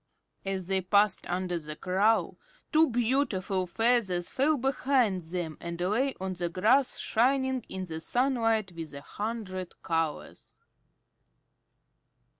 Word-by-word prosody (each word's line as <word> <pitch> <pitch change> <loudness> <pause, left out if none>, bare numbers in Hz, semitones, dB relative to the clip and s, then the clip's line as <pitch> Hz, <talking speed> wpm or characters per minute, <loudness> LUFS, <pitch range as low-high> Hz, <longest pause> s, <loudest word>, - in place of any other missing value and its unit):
As 190 -2 -1
they 190 +1 +1
passed 200 +2 +2
under 180 -1 -1
the 155 -1 -6
Crow 195 +6 +1 0.3
two 320 0 +5
beautiful 225 -7 0
feathers 205 -3 +2
fell 295 +3 +2
behind 255 -6 +1
them 165 -2 -4
and 170 0 -5
lay 225 +10 +1
on 190 0 -3
the 175 -1 -2
grass 235 +10 +3
shining 260 +1 +1
in 190 0 -4
the 160 -2 -6
sunlight 225 -1 +1
with 165 -4 -7
a 140 - -7
hundred 205 -2 -5
colors. 165 -2 -3
195 Hz, 120 wpm, -29 LUFS, 180-245 Hz, 0.3 s, two